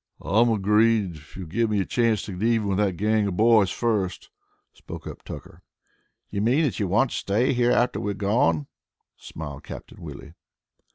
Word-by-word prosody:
"I'm 115 +4 +2
agreed, 105 -3 +2
if 75 +3 -15
you'll 95 - -6
give 115 +8 0
me 105 -1 +1
a 95 - 0
chance 115 -1 +1
to 105 - -7
get 90 0 -7
even 115 -2 +1
with 95 0 0
that 100 -4 +1
gang 105 +1 +1
of 90 -2 -3
boys 110 -3 +5
first," 105 -6 -2 0.4
spoke - - -10
up - - -8
Tucker. - - -10 0.7
"You 100 - -2
mean 125 +9 +3
that 140 - -1
you 100 - 0
want 120 +8 +2
to - - -3
stay 110 +7 +1
here 120 -1 +2
after 120 +1 +2
we've 100 -1 -3
gone?" 100 - +1 0.5
smiled 75 -3 -8
Captain - - -10
Willie. - - -9
105 Hz, 185 wpm, -25 LUFS, 95-115 Hz, 0.7 s, boys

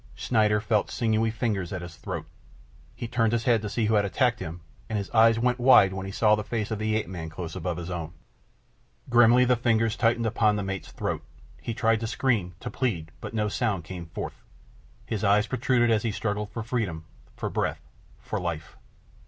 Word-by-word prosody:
Schneider 105 -3 +2
felt 105 -1 +1
sinewy 115 -2 +1
fingers 110 -6 -2
at 90 -2 -4
his 85 -1 -9
throat. - - -5 0.7
He 120 - -5
turned 115 -1 +1
his 115 -1 +1
head 115 -3 +3
to 105 - -4
see 115 +2 0
who 110 - +1
had 105 -1 +4
attacked 115 +3 +1
him, 85 -1 -6 0.3
and 110 - -1
his 100 -1 -4
eyes 115 0 +5
went 125 +1 +1
wide 120 -7 +6
when 95 0 -5
he - - -5
saw 105 +2 +3
the 105 0 +1
face 110 0 -3
of 110 - -2
the 110 0 0
ape 110 - 0
man 85 -3 -6
close 80 +1 -6
above 90 -2 -3
his 90 +1 -5
own. 85 -3 -4 1.0
Grimly 120 +1 +6
the 125 0 +4
fingers 115 -2 +1
tightened 115 -1 +2
upon 110 -1 +2
the 105 - -2
mate's 95 0 -5
throat. - - -3 0.4
He 115 - -4
tried 115 -2 +2
to 115 - -3
scream, 110 -8 0
to - - -5
plead, 85 -11 -2
but - - -6
no 105 -1 +1
sound 105 -4 -1
came 90 0 -7
forth. 80 - -6 0.6
His 105 - -3
eyes 105 +1 +4
protruded 125 -2 +2
as 110 -2 +3
he 115 -1 -1
struggled 105 -1 -2
for 115 - -5
freedom, 105 -10 -2 0.3
for - - -3
breath, - - -2 0.3
for - - -4
life. 85 -3 -5
110 Hz, 205 wpm, -27 LUFS, 95-115 Hz, 1.0 s, wide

